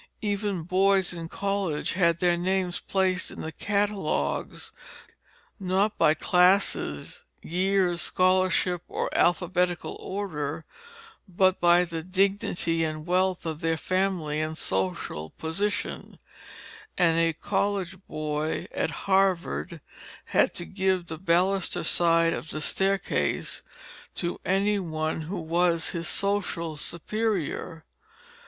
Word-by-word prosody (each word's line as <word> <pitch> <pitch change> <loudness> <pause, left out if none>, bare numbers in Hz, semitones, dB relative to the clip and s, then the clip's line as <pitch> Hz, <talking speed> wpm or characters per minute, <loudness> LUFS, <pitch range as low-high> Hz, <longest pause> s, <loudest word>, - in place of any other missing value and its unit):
Even 205 -4 -1
boys 190 +1 +2
in 165 -1 -6
college 195 -6 -1
had 170 -2 +3
their 175 0 +3
names 180 0 0
placed 185 -2 0
in - - -8
the 160 - -5
catalogues, 200 - -1 0.9
not 195 +3 +1
by 155 - +5
classes, 180 - +2 0.2
years, 185 0 +1
scholarship, 185 -1 +2
or - - -3
alphabetical 180 0 +1
order, 160 -6 -4 0.6
but 185 +1 +2
by 175 +1 +5
the 165 -1 -5
dignity 185 -2 0
and 155 -1 -3
wealth 185 0 +1
of 160 -1 -4
their 165 0 +1
family 180 -5 0
and 155 0 -3
social 90 - -2
position; 200 - -3 0.8
and 165 -2 +3
a 165 0 +3
college 195 +2 -1
boy 155 0 -2
at - - 0 0.2
Harvard 185 -3 +1 0.4
had - - +2
to 175 - -5
give 190 -2 0
the 160 -2 -7
baluster 185 +2 +1
side 165 0 +3
of 160 - -6
the 155 - -4
staircase 195 +5 0 0.5
to 175 -1 -3
any 200 +2 +2
one 160 -3 -2
who 175 +4 -4
was 170 0 +1
his 170 0 -3
social 195 -5 -1
superior. 170 -1 -3
180 Hz, 115 wpm, -27 LUFS, 165-190 Hz, 0.9 s, by